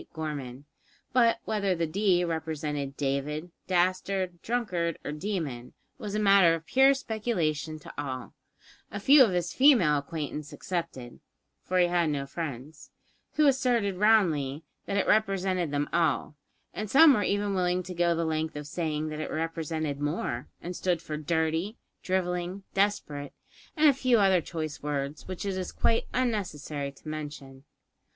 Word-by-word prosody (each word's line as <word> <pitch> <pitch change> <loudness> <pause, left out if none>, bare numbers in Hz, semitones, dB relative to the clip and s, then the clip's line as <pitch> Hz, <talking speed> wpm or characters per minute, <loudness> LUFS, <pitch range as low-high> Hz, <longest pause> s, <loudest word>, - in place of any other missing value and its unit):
Gorman"; 145 -4 -5 0.5
but 235 -2 +4
whether 200 -4 0
the 170 -1 0
"D" 180 +1 +2
represented 150 -4 -3
David, 145 +4 -2 0.2
dastard, 185 0 0
drunkard, 185 -9 -1
or - - -3
demon, 150 -8 -4 0.3
was 210 -4 -5
a - - +1
matter 195 -5 +6
of 165 0 -8
pure 270 +5 +5
speculation 170 - -2
to 155 - -12
all, 130 -3 -6 0.6
a 205 - -5
few 275 +7 +7
of 230 - +3
his 175 -1 -1
female 230 - +5
acquaintance 150 0 -5
excepted 155 -6 -5 0.4
(for 185 - -1
he 180 - +5
had 175 -2 +1
no 140 -2 -2
friends), 140 -1 -7 0.4
who 305 - +3
asserted 245 -8 +2
roundly 165 -9 +3 0.2
that 200 - -1
it 200 - +2
represented 190 -5 +1
them 145 0 -1
all, 160 -3 +1 0.4
and 215 0 -4
some 290 +5 +8
were 210 - +1
even 205 +1 0
willing 180 -1 +1
to 180 - -7
go 170 -1 +2
the 165 0 -1
length 160 0 -2
of 150 0 -6
saying 155 0 -2
that 155 0 -5
it 155 - -4
represented 160 -2 -3
more, 145 -5 -2
and 175 +1 -5
stood 180 -2 0
for 155 -2 -6
dirty, 160 - -1 0.2
drivelling, 180 0 -2
desperate, 155 -8 -1 0.4
and 305 0 +6
a 285 - +7
few 255 -2 +2
other 190 -4 +4
choice 155 -3 -5
words 145 0 -3
which 185 +1 -5
it 195 -1 -1
is 185 -1 -4
quite 230 - +1
unnecessary 155 - -2
to 140 - -17
mention. 145 -3 -7
170 Hz, 155 wpm, -28 LUFS, 150-200 Hz, 0.6 s, some